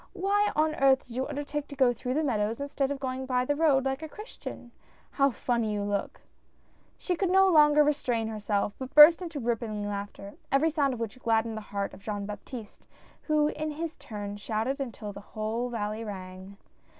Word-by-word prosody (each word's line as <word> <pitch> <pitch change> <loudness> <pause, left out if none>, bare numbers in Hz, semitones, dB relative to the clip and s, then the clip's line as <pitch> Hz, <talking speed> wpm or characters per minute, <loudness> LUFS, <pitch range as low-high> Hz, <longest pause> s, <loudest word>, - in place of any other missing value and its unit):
Why 405 +2 +1
on 310 +1 +2
earth 270 -2 +3
did 235 - -11
you 260 +1 -1
undertake 290 0 -4
to 285 - -9
go 260 -3 +4
through 250 +2 -3
the 310 - +1
meadows 225 -4 0
instead 280 -1 -1
of 285 -1 -3
going 260 -1 -3
by 250 -1 +1
the 290 - +1
road 285 -4 +3
like 270 +2 -1
a 315 - -6
Christian 415 - -9 0.2
— - - -32
How 275 0 +3
funny 235 -3 -1
you 205 -1 -1
look 200 -1 -3
I" - - -35 0.7
She 360 - -2
could 375 +1 0
no 385 +1 +6
longer 300 -3 +6
restrain 250 -6 0
herself, 210 -2 -1
but 260 0 -7
burst 305 +4 +10
into 330 -5 -5
rippling 225 -4 -2
laughter, 200 0 -6 0.2
every 290 +4 +3
sound 280 -4 +1
of - - -9
which 230 +1 -5
gladdened 225 -1 +1
the 220 - -5
heart 200 -1 -3
of - - -12
Jean 205 -1 -4
Baptiste, 210 +2 -9 0.4
who 300 -1 +3
in 310 0 -3
his 320 +2 -4
turn 205 -2 -6
shouted 220 +6 -2
until 220 -5 -5
the 200 - -9
whole 220 +4 -3
valley 215 -1 -3
rang. 190 -1 -8
250 Hz, 200 wpm, -28 LUFS, 215-295 Hz, 0.7 s, burst